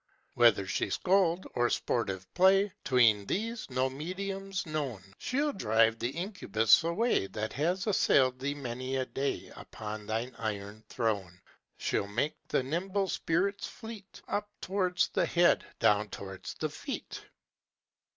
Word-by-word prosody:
"Whether 115 -5 +5
she - - -1
scold, 185 -1 +2
or 120 0 +2
sportive 95 -6 -1
play, 195 +2 +4
('Tween 115 -6 +4
these, 225 +1 -2
no 130 0 +1
medium's 190 +7 -4
known), 145 - -3 0.2
She'll 285 +3 0
drive 110 - +3
the 120 - -1
incubus 165 - +2
away 170 - +1
That 105 +3 -4
has 175 +7 0
assailed 130 - +3
thee 140 +2 -2
many 130 -1 -4
a 130 -1 0
day 140 +2 -3
Upon 105 -1 -7
thine 115 +3 -2
iron 105 -1 -4
throne. 100 -7 -2 0.4
She'll 100 - -1
make 120 +9 0
the - - +1
nimble 190 +7 -1
spirits 190 +6 0
fleet 220 -4 -10
Up 210 0 -2
towards 185 -1 +1
the - - +1
head, 175 0 +3
down 105 0 +3
towards 95 -1 -7
the - - -2
feet." - - -6
135 Hz, 135 wpm, -31 LUFS, -, 0.4 s, Whether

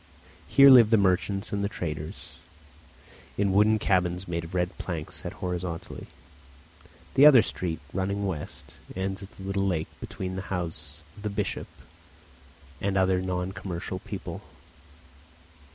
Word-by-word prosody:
Here 140 0 +8
live 120 -4 +8
the 115 - +5
merchants 100 +1 +1
and 100 0 0
traders, 75 -5 -5 1.1
in 100 -1 +2
wooden 105 +2 +5
cabins 90 -2 0
made 85 -1 -2
of 85 +2 -8
red 90 +1 0
planks 80 -4 -5
set - - -5
horizontally; 90 -1 -5 1.1
the 140 +2 +8
other 130 -7 +8
street, 85 -6 -3
running 100 +2 -1
west, 85 -7 -6 0.2
ends 95 +1 -3
at 100 - -9
the 95 - -10
little 100 0 0
lake 80 -4 -1
between 95 -1 -5
the - - -2
house 80 -4 -5
of - - -13
the 105 - -2
bishop 100 - -3 1.1
and 100 0 0
other 95 -1 +3
non 90 0 -2
commercial 95 -1 -5
people. - - -7
95 Hz, 135 wpm, -27 LUFS, 90-100 Hz, 1.1 s, Here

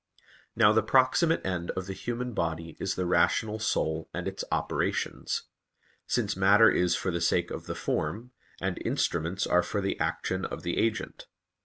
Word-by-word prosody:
Now 105 -3 +5
the 110 - +4
proximate 130 +8 +3
end 90 -2 -2
of 95 - -2
the 95 - -5
human 120 +4 -4
body 80 -3 -3
is 95 +1 -1
the 90 - -1
rational 105 +5 +2
soul 80 -7 -1
and - - -3
its - - -4
operations; - - -1 0.6
since 105 -5 0
matter 100 +4 +6
is 90 -1 +2
for 95 - -1
the 85 0 -2
sake 85 - +1
of - - -6
the - - -4
form, 110 +11 -2 0.3
and 95 -1 -3
instruments 85 +4 0
are 90 - +3
for 100 - -3
the 100 0 -2
action - - -1
of - - -5
the 85 0 -1
agent. 115 -1 -2
95 Hz, 170 wpm, -28 LUFS, 85-110 Hz, 0.6 s, matter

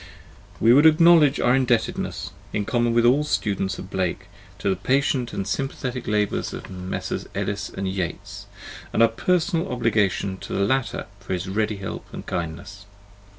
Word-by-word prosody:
We 115 +2 +6
would 145 +4 +7
acknowledge 160 -2 +6
our 125 - +3
indebtedness, 125 -3 0 0.2
in 105 - -1
common 120 +1 +1
with 120 0 +4
all 135 +5 +4
students 100 -9 -1
of 95 - -9
Blake, 95 -2 -2 0.3
to - - -4
the 95 - +2
patient 130 +3 0
and 95 - -4
sympathetic 130 -2 -3
labours 105 -1 0
of - - -9
Messrs. 90 0 -4
Ellis - - -2
and 95 - -4
Yeats, 100 +2 -4 0.5
and 115 - +4
our 115 - +6
personal 170 - 0
obligation 105 -5 0
to - - -8
the 100 - +1
latter 130 +3 -1
for 95 -1 -5
his 90 +1 -3
ready 105 +2 0
help 95 -1 -6
and - - -8
kindness. 90 +4 -5
110 Hz, 160 wpm, -24 LUFS, 95-130 Hz, 0.5 s, would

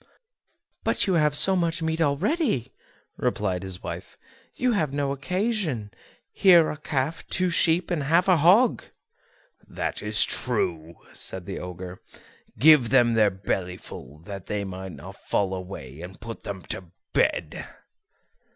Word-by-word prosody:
"But - - +2
you 190 - +1
have 150 -3 +3
so 190 +4 +6
much 170 -1 0
meat 160 +1 -1
already," 160 - 0 0.4
replied 95 -3 -1
his 95 -2 -8
wife, - - -7 0.4
"you 250 0 +1
have 160 - 0
no 140 -1 -1
occasion; 170 - -2 0.4
here 175 -4 +6
are - - -2
a 150 - -6
calf, 150 0 -2
two 185 0 0
sheep, 170 +1 +2
and 170 -4 0
half 165 +6 +2
a 185 -2 +5
hog." 195 - +4 0.8
"That - - -4
is 105 +1 +3
true," 80 0 -2 0.2
said 95 -2 -2
the 95 - -5
Ogre; 90 0 -8 0.6
"give 150 -5 +6
them 120 -2 +4
their 110 -2 +4
belly 95 -1 -3
full 70 -3 -11
that 100 -2 -8
they 105 -1 -2
may 95 0 -6
not 85 - -10
fall 95 -2 -1
away, 90 -7 -8
and 90 +2 -10
put 115 +1 -8
them 95 -3 -6
to 95 - -5 0.3
bed." - - 0
130 Hz, 150 wpm, -25 LUFS, -, 0.8 s, so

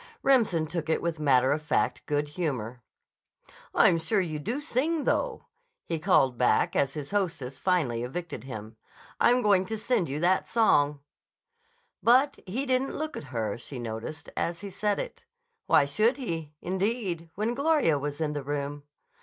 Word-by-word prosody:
Remsen 220 -12 +3
took 160 0 -4
it 160 - +2
with 170 -2 -2
matter 130 -3 +4
of 150 +2 0
fact 125 -5 0
good 145 0 0
humor. 130 -8 -3 0.9
"I'm 165 - +5
sure 200 +6 +1
you 160 -5 -2
do 230 - -3
sing, 295 +2 0
though," - - -1 0.4
he 165 -1 -2
called 135 -8 +3
back 125 - +3
as 135 +1 +1
his 145 -2 -6
hostess 165 -10 -2
finally 155 -11 +1
evicted 130 0 -5
him. 110 -3 -8 0.4
"I'm 245 +1 +4
going 200 -3 +4
to 220 +3 -4
send 215 - 0
you 140 +2 -3
that 180 +3 +2
song." 145 -11 +3 1.0
But 260 +4 +4
he 245 +9 -2
didn't 260 0 0
look 310 +1 -3
at - - -6
her, 115 -4 -3
she 135 - -8
noticed, 120 +6 -6
as 170 +1 -2
he 200 -1 -7
said 205 +2 0
it. - - -6 0.4
Why 140 - +5
should 215 - +2
he, 165 - -5
indeed, 190 -3 -2
when 215 +4 -1
Gloria 280 - +2
was 145 +1 -4
in 155 -2 -1
the 145 - -3
room? 145 +1 -3
165 Hz, 165 wpm, -28 LUFS, 140-215 Hz, 1.0 s, I'm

